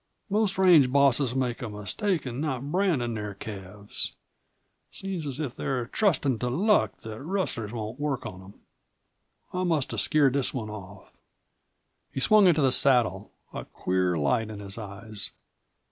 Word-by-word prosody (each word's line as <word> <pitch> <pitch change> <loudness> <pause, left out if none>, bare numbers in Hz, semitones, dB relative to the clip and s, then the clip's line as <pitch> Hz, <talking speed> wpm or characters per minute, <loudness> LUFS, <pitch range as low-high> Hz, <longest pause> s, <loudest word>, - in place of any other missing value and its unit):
Most 205 -2 +1
range 170 -9 +6
bosses 140 -2 +3
make 125 -1 -1
a 120 - -4
mistake 150 - -1
in 125 +1 -4
not 135 -5 -2
brandin' 165 -11 +1
their 105 -2 -5
calves. 100 0 -4 0.7
Seems 185 -6 -5
as 135 0 -4
if 140 -5 -3
they're 130 -3 -2
trustin' 145 - +1
to 125 - -1
luck 160 - +2
that 110 +1 -8
rustlers 155 - -2
won't 115 +2 -6
work 145 -3 -2
on 90 - -7
them. 95 +2 -14 1.0
I 180 0 -1
must 160 -6 0
have - - +2
scared 145 -4 +3
this 140 -2 0
one 110 -4 -4
off." 100 -2 -10 1.0
He - - -4
swung 210 +6 +6
into 160 -4 +4
the 130 - +4
saddle, 115 -7 +3 0.2
a - - -5
queer 90 -1 -1
light 80 +9 +1
in 105 -2 -7
his 100 -1 -5
eyes. 105 0 -7
125 Hz, 160 wpm, -27 LUFS, 105-155 Hz, 1.0 s, range